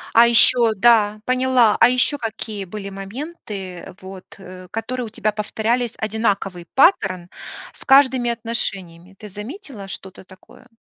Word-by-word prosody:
А 235 +1 +8
ещё 235 -1 +4
да, 215 -1 +3
поняла. 255 -3 +3
А - - +7
ещё 255 +4 +1
какие 220 -3 -5
были 200 +2 -7
моменты, 195 - -8
вот, 190 0 -10
э, 185 -1 -12
которые 235 +4 -4
у - - -9
тебя 215 -1 -1
повторялись, 225 +3 -2
одинаковый 200 -5 -2
паттерн 190 - +3 0.4
с - - -14
каждыми 265 -3 +4
отношениями? 195 -6 -5
Ты 210 - -10
заметила 215 - -9
что-то 190 -1 -10
такое? 190 +7 -19
215 Hz, 135 wpm, -20 LUFS, 195-245 Hz, 0.4 s, А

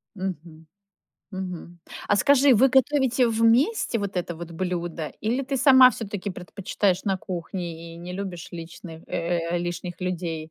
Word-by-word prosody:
Мгм. 165 -4 -6 0.6
Мгм. 180 -2 -7 0.3
А 205 - +4
скажи, 280 +2 +5
вы 260 +5 +5
готовите 265 -1 +3
вместе 230 - +2
вот 200 -2 -4
это 175 -2 -3
вот 170 0 -8
блюдо, 170 -2 -3
или 240 +6 0
ты 270 +1 -2
сама 260 -1 +8
всё-таки 205 -3 -5
предпочитаешь 185 +1 -2
на 195 -2 +1
кухне 170 -2 -6
и - - -11
не 175 +1 -8
любишь 185 -3 -6
личных 165 0 -9
э, 170 +1 -1 0.2
э, - - +1
лишних 175 0 -5
людей? 165 -3 -3
185 Hz, 150 wpm, -25 LUFS, 170-230 Hz, 0.6 s, сама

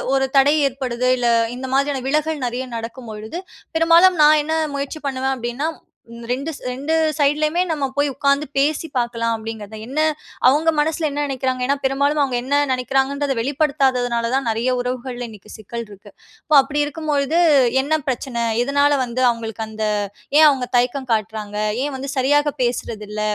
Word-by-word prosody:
ஒரு 270 0 +2
தடை 280 +2 +5
ஏற்படுது 255 -2 -2
இல்ல, 240 -1 +1 0.3
இந்த 260 +1 -5
மாதிரியான 275 -1 0
விலகல் 305 0 0
நிறைய 245 +2 -3
நடக்கும்பொழுது, 230 +3 -7 0.4
பெரும்பாலும் 335 +2 +5
நான் 305 +1 +6
என்ன 315 +2 -2 0.2
முயற்சி 280 +3 -4
பண்ணுவேன் 265 0 -1
அப்பிடின்னா, 240 +6 -2 0.6
2 275 +6 -2 0.2
2 275 +5 -3 0.2
சைட்லயுமே 305 +3 +2
நம்ம 295 -3 -1
போய் 290 0 +3
உட்கார்ந்து 280 +2 +1
பேசி 295 +3 +1
பார்க்கலாம் 230 -1 0
அப்பிடிங்கிறதா, 220 -1 -7
என்ன, 275 +4 -3 0.5
அவுங்க 300 +5 +4
மனசில 315 +1 0
என்ன 290 +1 -2
நினைக்கிறாங்க? 260 -1 -2
ஏன்னா, 280 +2 +2
பெரும்பாலும் 280 +3 +1
அவுங்க 265 -3 0
என்ன 275 +3 0 0.2
நினைக்கிறாங்கன்றத 270 +2 0
வெளிப்படுத்தாததுனால 260 -3 +1
தான் 265 -2 0
நிறைய 225 +3 0
உறவுகள்ல 250 0 -4
இன்னக்கி 210 -1 -14
சிக்கல் 230 +2 -6
இருக்கு. 205 -1 -14 0.3
அப்போ, 305 - +2
அப்பிடி 295 +2 -2
இருக்கும்பொழுது 295 +1 -1 0.4
என்ன 310 +3 0
பிரச்சன? 245 -2 -2 0.2
எதுனால 285 +2 +2
வந்து 250 +1 -3
அவுங்களுக்கு 225 -2 -4
அந்த 220 0 -5 0.6
ஏன் 310 - +9
அவுங்க 260 -3 -1
தயக்கம் 255 +2 0
காட்றாங்க? 215 -1 -3 0.3
ஏன் 290 0 -3
வந்து 275 +1 -6
சரியாக 290 +2 +2
பேசுறதில்ல? 215 -3 -3
265 Hz, 150 wpm, -20 LUFS, 240-290 Hz, 0.6 s, ஏன்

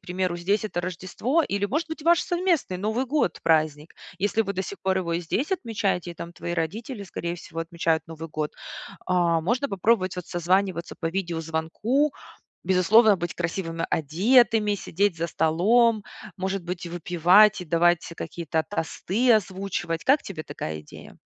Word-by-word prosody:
примеру, 180 -1 -2
здесь 200 +5 0
это 190 -5 -2
Рождество, 185 - -1
или, 200 -5 -1
может 305 +10 -1
быть, 320 0 -6
ваш 340 +2 +4
совместный 345 - 0
Новый 220 +6 -1
год- 275 - 0
праздник. 155 -1 +1 0.2
Если 205 +3 +1
вы 200 - -3
до 190 - -1
сих 200 - -7
пор 190 0 +1
его 170 -2 -2
и 170 - 0
здесь 245 - -2
отмечаете, 205 - -1
и - - -18
там 170 +1 -8
твои 175 0 -5
родители, 205 - -3
скорее 170 -1 -4
всего, 165 -1 -7
отмечают 165 -1 -1
Новый 165 0 -8
год, 150 -1 -3 0.5
а, 175 -2 +2
можно 250 - 0
попробовать 195 -1 +1
вот 180 - -6
созваниваться 180 0 0
по 165 - -1
видеозвонку. 170 - -1 0.5
Безусловно, 200 +4 +5
быть 175 -1 -4
красивыми 165 -1 -3
одетыми, 210 - +3
сидеть 200 0 0
за 170 - -1
столом, 215 +9 +3 0.3
может 190 0 -2
быть, 175 0 -5
и - - -6
выпивать, 180 +4 +4
и - - -7
давать 175 +1 +2
какие-то 160 -1 -2
тосты 205 +6 0
озвучивать. 190 -5 -1
Как 280 +3 +4
тебе 165 -5 -6
такая 80 0 -6
идея? 75 - -13
185 Hz, 160 wpm, -25 LUFS, 165-215 Hz, 0.5 s, Безусловно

